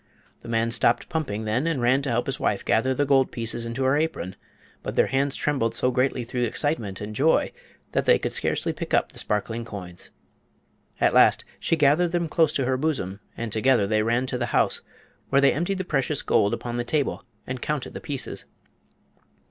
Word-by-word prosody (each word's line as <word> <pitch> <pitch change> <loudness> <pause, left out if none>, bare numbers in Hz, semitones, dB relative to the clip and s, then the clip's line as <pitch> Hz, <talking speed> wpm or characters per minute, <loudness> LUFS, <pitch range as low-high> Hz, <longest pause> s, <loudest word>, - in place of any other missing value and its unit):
The - - -10
man 115 0 +1
stopped 120 - +2
pumping 135 -11 -3
then 120 +8 0
and 165 -5 0
ran 125 +3 +3
to 140 - -3
help 120 +1 0
his 135 - -3
wife 100 - -1
gather 130 +4 +2
the 145 - +1
gold 135 -1 +3
pieces 115 0 -2
into 115 +3 -3
her 130 +1 +3
apron; 150 - -2 0.5
but - - -5
their - - +4
hands 135 +1 0
trembled 135 -6 0
so 125 - +1
greatly 130 0 0
through 125 +1 -4
excitement 120 -5 -1
and 105 +1 -6
joy 155 +7 +3 0.4
that - - 0
they - - +6
could - - -3
scarcely - - 0
pick - - -2
up - - +1
the - - -4
sparkling 110 +3 -1
coins. 95 -6 -9 0.9
At - - +3
last - - +5
she - - +1
gathered 160 +3 +3
them 170 -1 0
close 160 -1 +3
to 135 - 0
her 130 +1 +1
bosom 130 - -2 0.2
and 115 -2 -4
together 115 0 +3
they 110 +1 +1
ran 120 +3 +1
to 125 -1 -3
the 120 - -1
house, - - +2 0.5
where 135 - +4
they 140 - +5
emptied 175 +6 -1
the 185 - -3
precious 145 -2 0
gold 100 - +2
upon 120 0 -5
the 120 - -1
table 140 +4 -1 0.2
and 130 -1 -5
counted 150 -3 -3
the - - -7
pieces. 140 -3 -5
130 Hz, 205 wpm, -25 LUFS, 115-145 Hz, 0.9 s, they